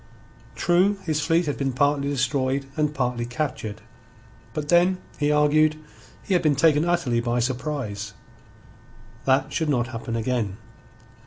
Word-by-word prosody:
True, 180 +4 +3
his 155 -2 -1
fleet 165 +3 +2
had 145 - -2
been 135 -2 -1
partly 140 +2 +1
destroyed 135 0 0
and 150 -1 +1
partly 125 -4 -1
captured. 120 -4 -4 0.7
But 150 +3 -5
then, 175 +2 +4 0.2
he 145 0 +2
argued, 150 +1 +3 0.5
he 195 - -1
had 180 - +3
been 155 -3 +3
taken 150 +2 +4
utterly 170 -9 +1
by 120 +1 -1
surprise. 120 -5 -3 1.1
That 135 +1 +2
should 160 -2 0
not 120 -3 +1
happen 115 -1 -5
again. 115 -4 -1
140 Hz, 140 wpm, -24 LUFS, 125-155 Hz, 1.1 s, then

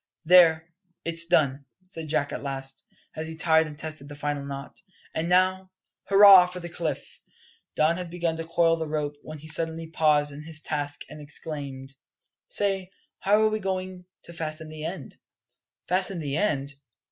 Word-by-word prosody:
"There, 165 -1 +5 0.3
it's 165 0 +2
done," 140 -5 +2 0.2
said 165 -4 -7
Jack 145 -2 0
at - - -4
last, 135 -1 -5 0.3
as 155 0 -4
he 160 - -6
tied 160 0 +3
and 150 -1 -10
tested 155 -2 -7
the 145 - -8
final 145 -1 -3
knot. 140 0 -8 0.3
"And 165 +2 -2
now, 185 +1 +2 0.4
hurrah 195 -2 +9
for 180 0 -7
the 175 -1 -7
cliff!" 170 -2 -5 0.5
Don 160 +2 +3
had 180 -2 -5
begun 170 -1 -1
to 165 0 -5
coil 165 0 +3
the 160 -1 -3
rope, 150 -1 -2
when 155 - -9
he 155 +2 -12
suddenly 160 +1 -1
paused 150 -2 +2
in 145 +1 -9
his 160 0 -4
task 145 -2 -3
and 150 - -10
exclaimed: 140 -3 -6 0.5
"Say, 195 -2 -1 0.3
how 210 +2 +3
are 215 - +4
we 215 0 -2
going 185 -2 -4 0.2
to 170 - -11
fasten 155 -1 -4
the 155 0 -8
end?" 165 -7 -6 0.7
"Fasten 185 +1 0
the 145 -4 -3
end? 145 -7 0
160 Hz, 170 wpm, -26 LUFS, 150-180 Hz, 0.7 s, hurrah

